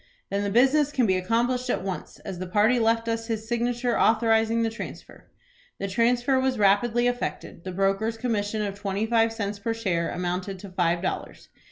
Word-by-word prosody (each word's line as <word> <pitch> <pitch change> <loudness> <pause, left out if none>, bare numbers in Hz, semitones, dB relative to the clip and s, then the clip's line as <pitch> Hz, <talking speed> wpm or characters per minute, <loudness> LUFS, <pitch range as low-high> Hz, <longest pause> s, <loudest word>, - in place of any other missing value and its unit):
"Then 200 - 0
the 200 - -1
business 270 +7 +3
can 260 -4 +2
be 190 -3 +2
accomplished 240 +7 0
at - - 0
once, 190 -2 -5
as 180 - -5
the 185 - -4
party 215 +6 +3
left 230 0 +1
us 225 0 -2
his 220 -1 -3
signature, 240 +1 0
authorizing 225 0 +3
the 225 - 0
transfer." 230 - -9 0.5
The 195 - -3
transfer 240 +6 +2
was 260 -1 0
rapidly 215 +4 +3
effected. 245 -7 -3
The 185 - -4
broker's 195 +4 0
commission 215 -3 -1
of 200 -1 -2
twenty 200 +1 -1
five 225 0 +2
cents 205 -2 -4
per 225 +3 -2
share 180 -7 -1
amounted 180 +2 -3
to 195 +2 -10
five 175 -1 0
dollars. 190 - -4
225 Hz, 185 wpm, -26 LUFS, 195-235 Hz, 0.5 s, business